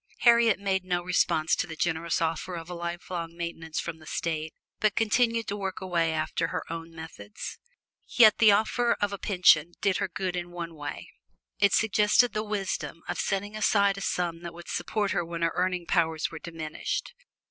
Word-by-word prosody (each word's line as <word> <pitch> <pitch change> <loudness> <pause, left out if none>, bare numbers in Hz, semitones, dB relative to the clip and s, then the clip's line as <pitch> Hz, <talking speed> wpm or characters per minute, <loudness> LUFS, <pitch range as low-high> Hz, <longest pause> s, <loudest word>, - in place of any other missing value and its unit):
Harriet 235 -3 +6
made 190 -2 0
no 175 -1 -1
response 165 -3 +2
to - - -2
the 160 - -7
generous 165 0 0
offer 165 +3 -2
of 165 +1 -7
a - - -3
lifelong 170 -1 -5
maintenance 165 -2 -4
from 165 -1 -5
the 155 - -15
State, 160 -1 -2 0.3
but 215 -1 +2
continued 230 0 +2
to 200 - -2
work 195 -2 -4
away 170 -3 0
after 160 +1 -1
her - - -3
own 165 0 -6
methods. 160 -11 -8 0.5
Yet 220 -4 +6
the 220 -2 +7
offer 230 +3 +2
of 205 -1 0
a 200 - -5
pension 175 -4 +4
did 195 -2 +1
her - - -1
good 185 0 -3
in 175 0 -4
one 170 -1 -6
way: 145 -2 -7 0.5
it 200 -1 +4
suggested 210 +3 +4
the 215 - 0
wisdom 195 -5 -3
of - - -3
setting 205 +1 -2
aside 200 -2 +3
a 195 - -7
sum 170 -3 -1
that 170 -1 -7
would 170 0 -11
support 205 -3 -1
her 175 -2 0
when 170 0 -4
her 165 - +2
earning 180 -1 0
powers 160 -3 +1
were 165 - -7
diminished. 165 - -4
175 Hz, 190 wpm, -28 LUFS, 165-200 Hz, 0.5 s, the